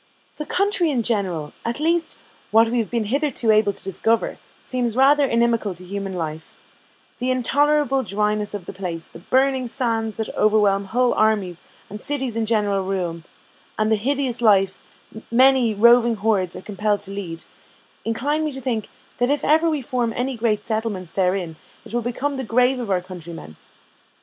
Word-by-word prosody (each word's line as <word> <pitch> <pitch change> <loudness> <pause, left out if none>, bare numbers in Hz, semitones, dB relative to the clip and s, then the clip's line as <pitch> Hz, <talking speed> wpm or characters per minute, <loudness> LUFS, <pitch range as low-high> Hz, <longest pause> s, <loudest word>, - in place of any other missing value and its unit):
The 300 - -5
country 390 -3 +1
in 250 -5 0
general 185 -10 -2
at 235 +4 -3
least, 330 +2 0 0.3
what 225 +1 +5
we 240 +1 0
have 225 - -2
been 235 -2 0
hitherto 275 -6 +1
able 215 -1 +4
to - - -12
discover, 220 +4 0 0.2
seems 245 -3 -2
rather 280 +2 +5
inimical 230 -5 +1
to 180 - -12
human 195 0 -5
life; 160 -2 -5 0.7
the 250 +1 -1
intolerable 270 +2 +2
dryness 210 -1 -1
of 195 -4 -7
the - - -7
place, 175 -3 -5
the - - -13
burning 260 +5 +1
sands 225 -3 -2
that 220 - -4
overwhelm 210 -2 +3
whole 245 +5 +1
armies 205 -5 +1 0.3
and 210 +1 -8
cities 265 -5 -2
in 225 -1 -1
general 205 -3 +1
ruin, 175 -4 -3 0.5
and 215 0 +1
the - - +5
hideous 255 +2 -1
life 195 -4 +3 0.5
many 255 -1 +4
roving 235 +2 +5
hordes 200 -4 0
are - - -7
compelled 210 0 -1
to 195 -1 -8
lead, 175 -5 -6 0.6
incline 285 +7 -1
me 305 - -1
to 265 - -6
think, 235 -5 -3 0.3
that 245 +1 +2
if 290 +1 0
ever 320 +2 +4
we 300 -4 -1
form 245 -3 -1
any 255 +2 -2
great 220 -2 0
settlements 220 -6 -3
therein, 180 -4 -1 0.3
it 220 - -11
will 240 - +1
become 265 +4 -2
the 265 - -3
grave 250 +2 +2
of 235 -4 -4
our 185 -2 +1
countrymen. 170 - -9
225 Hz, 175 wpm, -22 LUFS, 195-255 Hz, 0.7 s, what